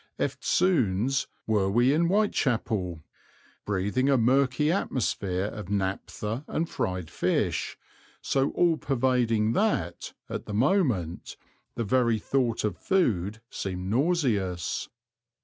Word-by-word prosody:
Eftsoons 130 - +1 0.2
were 105 -3 +1
we 120 +6 +3
in 165 +3 +2
Whitechapel, 115 - 0 0.6
breathing 105 +7 0
a 135 - +4
murky 135 +5 +3
atmosphere 100 - -1
of 105 -2 -6
naptha 100 +4 -3
and 165 +2 -1
fried 90 - -3
fish, - - -1 0.4
so 135 0 +1
all 170 -2 +3
pervading 120 -5 +1
that, 125 - -1
at - - -6
the 105 - -4
moment, 120 - 0 0.4
the 115 - -1
very 115 +1 +2
thought 120 0 0
of 100 -6 -2
food 110 - 0
seemed 95 0 -4
nauseous. 115 - 0
115 Hz, 110 wpm, -27 LUFS, 100-135 Hz, 0.6 s, a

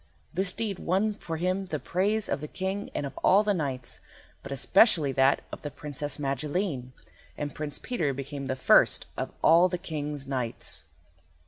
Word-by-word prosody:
This 185 +2 +1
deed 210 -2 -3
won 195 +5 +1
for 165 -5 -5
him 185 +3 -1
the 155 - -2
praise 200 +7 0
of - - -2
the 150 - -4
King 190 +5 -3
and 145 - -1
of 135 -1 -7
all 200 +3 +6
the 210 -1 +2
knights, 135 -8 -3 0.4
but 140 - -9
especially 160 - +5
that 135 +1 +3
of - - -7
the 145 - -4
Princess 145 0 -4
Magilene, 140 0 -2 0.5
and 145 -1 -3
Prince 150 -1 -4
Peter 170 - -1
became 140 +1 -5
the 130 - -1
first 130 - +5
of - - -3
all 170 +3 +6
the 180 - -2
King's 150 -5 -4
knights. 130 -4 -1
155 Hz, 175 wpm, -28 LUFS, 140-190 Hz, 0.5 s, all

